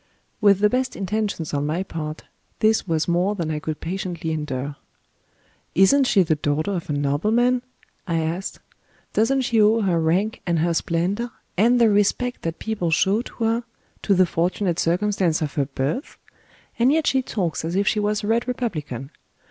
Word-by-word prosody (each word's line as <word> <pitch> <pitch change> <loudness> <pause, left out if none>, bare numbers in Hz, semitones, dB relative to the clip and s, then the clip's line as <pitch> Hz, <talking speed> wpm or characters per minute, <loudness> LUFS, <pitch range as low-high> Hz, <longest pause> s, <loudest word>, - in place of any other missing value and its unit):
With 200 -2 +5
the 210 - +6
best 255 +4 -1
intentions 200 -5 -2
on 145 0 0
my 165 +5 -1
part, 155 -4 -6 0.3
this 220 -2 +2
was 160 -2 0
more 180 +4 +1
than 165 -5 -2
I 150 - -2
could 155 0 -4
patiently 175 -2 -4
endure. 145 -2 -3 1.0
"Isn't 265 +9 +5
she 195 -5 +4
the 160 - +1
daughter 150 +5 -1
of 175 -5 -4
a - - 0
nobleman?" 215 - +2 0.5
I 170 -2 0
asked. 165 +4 -3 0.6
"Doesn't 265 +5 +2
she 235 -3 +2
owe 220 +2 +4
her 180 -5 +1
rank 185 +7 0
and 170 -1 +2
her 170 +2 +1
splendor, 180 +9 -1 0.3
and 235 +6 +4
the 235 - +6
respect 205 +5 +1
that 165 -1 -3
people 215 -6 -2
show 195 +7 +2
to 240 - -7
her, 230 +2 +1 0.4
to 200 - +2
the 185 0 +5
fortunate 175 +1 -1
circumstance 180 -1 +1
of 150 -2 -3
her 140 - 0
birth? 140 - -3 0.6
And 245 +3 +5
yet 315 0 +2
she 265 - +2
talks 185 -12 -2
as 165 +2 -3
if 200 +1 +1
she 215 - +2
was 210 0 0
a - - -2
red 230 +3 +1
republican. 155 - -4
185 Hz, 180 wpm, -23 LUFS, 160-220 Hz, 1.0 s, the